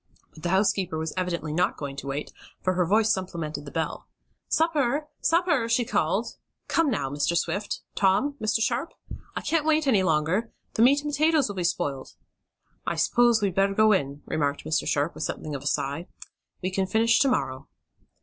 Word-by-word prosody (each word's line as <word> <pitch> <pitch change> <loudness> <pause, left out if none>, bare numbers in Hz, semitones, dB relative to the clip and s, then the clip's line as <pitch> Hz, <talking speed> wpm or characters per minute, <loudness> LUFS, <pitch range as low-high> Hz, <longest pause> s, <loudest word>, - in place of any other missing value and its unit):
But 155 - -14
the 175 - -2
housekeeper 190 -3 +1
was 160 0 -3
evidently 170 -4 -2
not 175 +3 +1
going 140 -2 -5
to 140 - -6
wait, 140 +2 -4 0.3
for 185 - +2
her 180 -1 +1
voice 215 +3 +4
supplemented 165 -6 -4
the 140 - -8
bell. 165 -1 -3 0.4
"Supper! 300 -3 +1
Sup 335 +2 +3
per!" 265 -10 +1
she 230 +1 +2
called. 195 +5 0 0.3
"Come 330 -3 +2
now, 140 - -1
Mr. 145 +4 0
Swift; 195 +6 -2
Tom, 200 +9 +2
Mr. 215 +1 +1
Sharp! 255 +7 -2 0.4
I - - -2
can't 325 -2 +1
wait 310 0 +2
any 230 -8 +4
longer! 180 +6 +1 0.2
The - - 0
meat 280 +4 +5
and 295 - -2
potatoes 305 -3 +3
will 205 - -5
be 180 - -2
spoiled!" 145 -6 -2 0.7
"I - - -2
s'pose 240 -3 +3
we'd 195 -3 +1
better 195 +1 +2
go 215 +1 +5
in," 140 -7 0
remarked 145 -2 -1
Mr. 155 -3 0
Sharp, 145 +3 0
with - - -9
something 155 - -4
of 140 - -4
a 140 - -5
sigh. 145 +5 -1 0.6
"We 185 - -1
can 190 0 0
finish 225 +3 +3
to 275 - +4
morrow." 135 - -1
190 Hz, 190 wpm, -26 LUFS, 155-240 Hz, 0.7 s, meat